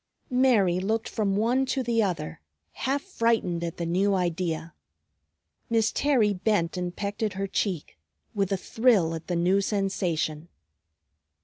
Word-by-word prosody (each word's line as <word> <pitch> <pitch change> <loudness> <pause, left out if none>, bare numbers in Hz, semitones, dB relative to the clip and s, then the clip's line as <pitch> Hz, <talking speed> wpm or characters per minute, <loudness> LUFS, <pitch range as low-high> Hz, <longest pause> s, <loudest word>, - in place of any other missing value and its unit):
Mary 220 -9 +4
looked 220 +4 -1
from 200 -3 -1
one 235 +6 +2
to 265 0 -1
the 230 -1 +1
other, 170 - -2 0.3
half 275 +2 -2
frightened 230 - 0
at 170 -1 -4
the 170 - -2
new 195 +4 +2
idea. 170 -2 -2 1.0
Miss 225 -1 +2
Terry 250 -8 +2
bent 185 -3 0
and 180 -1 -3
pecked 205 +1 -4
at 215 -2 0
her 195 +1 -2
cheek, 185 - -3 0.3
with 200 -2 0
a 195 - +2
thrill 205 -5 +2
at 160 0 -7
the 180 - -1
new 180 +4 +3
sensation. 175 -6 -1
195 Hz, 145 wpm, -27 LUFS, 175-225 Hz, 1.0 s, Mary